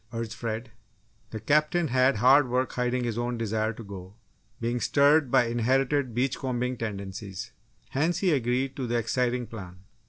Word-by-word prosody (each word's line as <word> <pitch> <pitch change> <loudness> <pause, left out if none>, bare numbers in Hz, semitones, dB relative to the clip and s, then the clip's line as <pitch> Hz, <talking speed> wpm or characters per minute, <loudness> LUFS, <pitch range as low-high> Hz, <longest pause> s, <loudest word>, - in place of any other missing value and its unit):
urged 115 -1 -4
Fred. 115 0 -5 0.6
The 110 - -6
Captain 150 - +2
had 130 +1 +3
hard 130 +5 +5
work 125 +1 0
hiding 125 0 0
his 120 -1 -2
own 120 0 -2
desire 110 -1 -1
to 115 - -10
go, 100 -1 -10 0.4
being 120 +1 -1
stirred 145 +2 +4
by 120 - +4
inherited 130 +2 +1
beach 130 +2 0
combing 125 -1 -2
tendencies. 100 -1 -6 0.4
Hence, 155 +7 0
he 185 -1 +2
agreed 130 +1 0
to 130 -3 -3
the 120 0 0
exciting 125 +1 0
plan. 90 -5 -10
120 Hz, 160 wpm, -27 LUFS, 110-130 Hz, 0.6 s, hard